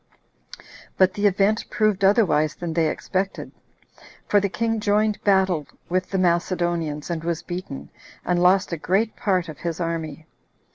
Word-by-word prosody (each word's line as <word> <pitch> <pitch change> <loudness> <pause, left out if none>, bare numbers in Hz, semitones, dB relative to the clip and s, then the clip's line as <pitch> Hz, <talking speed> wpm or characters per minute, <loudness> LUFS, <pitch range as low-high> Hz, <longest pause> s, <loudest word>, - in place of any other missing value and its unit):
But 185 -1 +4
the 205 0 +2
event 205 +3 +1
proved 215 -3 +1
otherwise 190 -7 +3
than 170 -2 -4
they 160 -1 +2
expected; 190 +1 -3 0.7
for 205 - +3
the 200 0 -1
king 225 +4 -1
joined 210 0 +1
battle 190 -6 +2 0.2
with 185 +1 -1
the 195 - -1
Macedonians, 175 -3 0
and 165 -1 -3
was 170 -1 -2
beaten, 175 -6 -7 0.3
and 175 -1 +1
lost 185 +1 +4
a - - -1
great 195 +8 0
part 190 -6 0
of 155 -4 -9
his 170 -1 -4
army. 160 -3 -4
185 Hz, 150 wpm, -23 LUFS, 170-200 Hz, 0.7 s, But